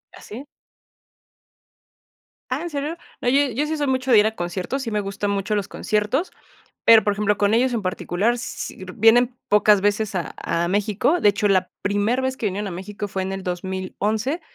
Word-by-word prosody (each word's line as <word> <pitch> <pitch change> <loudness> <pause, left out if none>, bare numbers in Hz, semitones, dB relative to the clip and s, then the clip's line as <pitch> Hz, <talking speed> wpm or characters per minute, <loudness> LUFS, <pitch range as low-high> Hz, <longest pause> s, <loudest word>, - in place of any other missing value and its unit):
¿Ah - - -14
sí? 245 +7 -9 2.1
Ah, 260 +5 -1
¿en 345 - -4
serio? 300 +2 -4 0.2
No, 245 - +1
yo 280 +1 +3
yo 275 +6 -1
sí 315 +1 -2
soy 290 -2 -1
mucho 260 0 0
de 220 - +8
ir 210 - +4
a 220 - -3
conciertos, 180 +9 -3
sí 230 - -4
me 210 - 0
gustan 200 0 -3
mucho 200 +1 -1
los 200 -1 -1
conciertos, 215 - -1 0.5
pero, 225 -1 +7
por 205 - +2
ejemplo, 210 0 0
con 205 0 +2
ellos 250 +2 +2
en 220 - -1
particular, 190 +5 -1
sí 210 -5 -6
vienen 240 +3 +4
pocas 210 -1 +5
veces 205 +1 0
a 175 -2 -3
a 170 +1 -1
México. 210 - +1
De - - +5
hecho, 205 +1 +1
la 185 -2 +2
primer 205 +5 0
vez 260 0 -1
que 225 - -3
vinieron 200 +1 -2
a - - -6
México 200 +3 -6
fue 190 -1 -3
en 190 +1 -3
el 195 0 -5
2011 190 - -2
210 Hz, 200 wpm, -22 LUFS, 195-250 Hz, 2.1 s, de